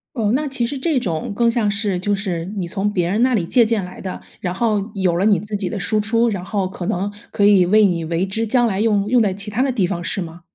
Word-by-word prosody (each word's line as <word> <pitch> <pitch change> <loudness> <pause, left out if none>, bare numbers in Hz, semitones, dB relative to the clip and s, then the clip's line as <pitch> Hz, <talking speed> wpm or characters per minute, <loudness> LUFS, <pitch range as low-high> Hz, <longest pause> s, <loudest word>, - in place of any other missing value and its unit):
哦， 220 -4 +1
那 300 +3 0
其 265 -3 -1
实 280 +3 -4
这 295 +1 +1
种 170 -7 -3
更 235 +2 +3
像 230 -3 +1
是 200 -2 -1
就 205 +3 0
是 185 -4 -2
你 185 - -2
从 200 +4 -2
别 175 -4 0
人 210 +6 +1
那 255 0 +3
里 195 -7 +1
借 240 +6 +4
鉴 220 -3 0
来 180 - -10
的， 185 - -6 0.2
然 180 - -2
后 210 0 0
有 185 -4 +1
了 185 - +1
你 210 -3 +4
自 210 +2 -4
己 195 -3 -2
的 205 - -4
输 215 +3 0
出， 230 +3 +2
然 195 -5 -3
后 195 -1 -1
可 185 -2 -6
能 200 0 -2 0.2
可 205 - +1
以 195 -3 +5
为 215 +4 +5
你 170 -3 -1
为 170 +3 -1
之 220 +4 -2
将 240 +2 +2
来 200 -3 -1
用 210 -2 +2
用 245 +1 +4
在 200 -3 +1
其 200 +2 -5
它 230 +5 0
的 275 - +1
地 220 -8 +1
方 175 -1 -3
是 195 +4 -2
吗？ 170 -1 -7
205 Hz, 300 characters per minute, -20 LUFS, 185-225 Hz, 0.2 s, 以